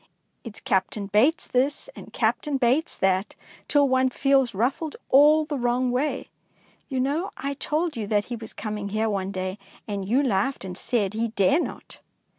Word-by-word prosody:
It^s 225 Hz, -3 st, -10 dB
Captain 200 Hz, -3 st, 0 dB
Bates 220 Hz, -, +2 dB
this 270 Hz, -, 0 dB
and -, -, -11 dB
Captain 295 Hz, -3 st, 0 dB
Bates 260 Hz, +5 st, +1 dB
that, 190 Hz, +1 st, +1 dB, 0.3 s
till 290 Hz, -1 st, +4 dB
one 260 Hz, 0 st, +3 dB
feels 270 Hz, -3 st, +2 dB
ruffed 265 Hz, -, -1 dB
all 300 Hz, +3 st, +6 dB
the 295 Hz, -2 st, -3 dB
wrong 245 Hz, +1 st, +1 dB
way. 270 Hz, +2 st, -2 dB, 0.6 s
You 265 Hz, -2 st, -2 dB
know 295 Hz, +9 st, 0 dB
I 280 Hz, +1 st, -3 dB
told 305 Hz, +3 st, -2 dB
you 220 Hz, -3 st, -4 dB
that 205 Hz, 0 st, +1 dB
he 245 Hz, -, -5 dB
was 225 Hz, -1 st, -9 dB
coming 210 Hz, -2 st, -5 dB
here 215 Hz, +2 st, 0 dB
one 195 Hz, -1 st, -2 dB
day, 185 Hz, +1 st, -4 dB, 0.3 s
and 200 Hz, -2 st, -4 dB
you 265 Hz, +5 st, +3 dB
laughed 220 Hz, -1 st, 0 dB
and 180 Hz, -1 st, -6 dB
said 205 Hz, -1 st, -1 dB
he 225 Hz, +2 st, 0 dB
dare 220 Hz, -, +2 dB
not -, -, -7 dB
245 Hz, 175 wpm, -25 LUFS, 205-275 Hz, 0.6 s, all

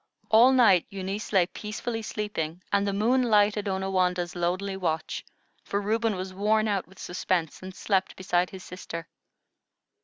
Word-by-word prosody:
All 235 Hz, +4 st, +7 dB
night 220 Hz, -9 st, +5 dB
Eunice 195 Hz, +1 st, -5 dB
lay 190 Hz, -4 st, +4 dB
peacefully 220 Hz, +4 st, -5 dB
sleeping, 185 Hz, -6 st, -4 dB
and 200 Hz, 0 st, +3 dB
the -, -, +1 dB
moon 230 Hz, +6 st, +2 dB
lighted 210 Hz, -3 st, +3 dB
Onawandah's 185 Hz, -2 st, 0 dB
lonely 185 Hz, +3 st, -1 dB
watch, 165 Hz, -4 st, -2 dB, 0.4 s
for 200 Hz, -, -2 dB
Reuben 220 Hz, +1 st, 0 dB
was 185 Hz, 0 st, -5 dB
worn 215 Hz, +3 st, +2 dB
out 200 Hz, -3 st, -1 dB
with 190 Hz, +1 st, -19 dB
suspense, 175 Hz, -3 st, -2 dB
and 185 Hz, 0 st, -8 dB
slept 195 Hz, -2 st, 0 dB
beside 180 Hz, -1 st, 0 dB
his 190 Hz, -1 st, -10 dB
sister. 165 Hz, -2 st, -7 dB
195 Hz, 150 wpm, -27 LUFS, 180-210 Hz, 0.4 s, All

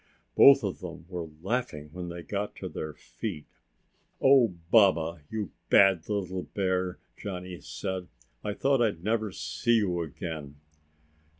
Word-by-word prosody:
Both 135 Hz, -2 st, +8 dB
of 100 Hz, -3 st, -2 dB
them 85 Hz, -2 st, -8 dB
were 85 Hz, -3 st, -5 dB
laughing 95 Hz, -9 st, -2 dB
when 90 Hz, -1 st, -5 dB
they 85 Hz, 0 st, -7 dB
got 100 Hz, +5 st, -3 dB
to -, -, -6 dB
their 75 Hz, -1 st, -6 dB
feet. 75 Hz, -, -6 dB, 0.7 s
"Oh, 130 Hz, -8 st, +5 dB, 0.2 s
Baba, 85 Hz, -7 st, +4 dB
you 110 Hz, -3 st, -3 dB, 0.2 s
bad 95 Hz, -3 st, +5 dB
little 95 Hz, -3 st, -2 dB
bear!" 95 Hz, -2 st, -1 dB, 0.2 s
Johnny 90 Hz, -3 st, -6 dB
said. 90 Hz, +9 st, -4 dB, 0.4 s
"I 105 Hz, -, -2 dB
thought 135 Hz, -2 st, +2 dB
I'd 100 Hz, -8 st, 0 dB
never 110 Hz, 0 st, 0 dB
see 120 Hz, +5 st, 0 dB
you 90 Hz, -6 st, +1 dB
again!" 80 Hz, -2 st, -6 dB
95 Hz, 135 wpm, -28 LUFS, 85-105 Hz, 0.7 s, Both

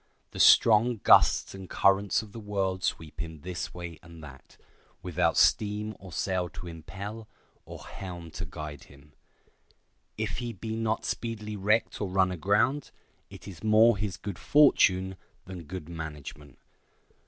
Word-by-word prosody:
The -, -, -8 dB
strong 115 Hz, +2 st, +6 dB
gusts -, -, +5 dB
and 95 Hz, -1 st, -10 dB
currents 100 Hz, +2 st, +2 dB
of 105 Hz, -, -13 dB
the 115 Hz, -, -9 dB
world 95 Hz, -3 st, -2 dB
sweep 80 Hz, -1 st, -3 dB
him 80 Hz, -2 st, -6 dB
this 90 Hz, +2 st, -5 dB
way 85 Hz, -2 st, -8 dB
and 85 Hz, -2 st, -13 dB
that, 70 Hz, -3 st, -14 dB, 0.5 s
without 85 Hz, -2 st, 0 dB
steam 105 Hz, 0 st, +2 dB
or 95 Hz, -2 st, -12 dB
sail 90 Hz, +1 st, -1 dB
to 90 Hz, +1 st, -10 dB
impel, 100 Hz, +7 st, -8 dB, 0.4 s
or -, -, -10 dB
helm 85 Hz, -3 st, -8 dB
to -, -, -6 dB
guide 75 Hz, -2 st, -8 dB
him. 70 Hz, +1 st, -19 dB, 1.0 s
If 105 Hz, -1 st, -3 dB
he 120 Hz, -1 st, -4 dB
be 110 Hz, +2 st, -5 dB
not 110 Hz, 0 st, -1 dB
speedily 110 Hz, -2 st, -4 dB
wrecked 105 Hz, +4 st, 0 dB
or 100 Hz, -, -2 dB
run 95 Hz, 0 st, +2 dB
aground, 105 Hz, -, +1 dB, 0.4 s
it -, -, -12 dB
is 90 Hz, -4 st, -10 dB
more 110 Hz, +2 st, +5 dB
his 100 Hz, -4 st, -4 dB
good 100 Hz, 0 st, -7 dB
fortune 95 Hz, -10 st, +4 dB, 0.3 s
than 90 Hz, -3 st, -9 dB
good 90 Hz, -1 st, -7 dB
management. 75 Hz, -4 st, -8 dB
95 Hz, 150 wpm, -28 LUFS, 85-105 Hz, 1.0 s, strong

